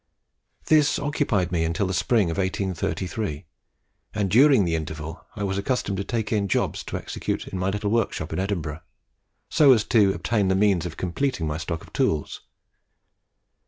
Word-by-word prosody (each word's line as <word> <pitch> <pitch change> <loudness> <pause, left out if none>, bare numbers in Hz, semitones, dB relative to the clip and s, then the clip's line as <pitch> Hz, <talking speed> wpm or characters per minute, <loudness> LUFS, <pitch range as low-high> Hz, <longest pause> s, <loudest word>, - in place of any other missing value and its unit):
This 150 -2 +4
occupied 140 - 0
me 85 -2 +1
until 80 +4 0
the 95 - -2
spring 90 +1 +2
of - - -4
1833, 95 -2 -2 0.7
and 100 -3 0
during 130 -2 +6
the 85 - -1
interval 80 0 -5
I 105 - -4
was 95 0 -1
accustomed 100 -3 -1
to - - -1
take 110 -1 -3
in 100 -2 +1
jobs - - -1
to - - -4
execute - - -4
in 95 - -5
my 95 +1 0
little 105 +1 -2
workshop 110 -8 -1
in - - -2
Edinburgh, 85 -6 -3 0.7
so 140 -4 +7
as 110 -4 +2
to 105 -4 +4
obtain 105 -4 0
the 95 - +2
means 95 -4 +2
of 80 - -9
completing 95 - -1
my 75 +1 -2
stock 85 -2 -4
of - - -19
tools. 75 -2 -1
95 Hz, 170 wpm, -24 LUFS, 85-110 Hz, 0.7 s, so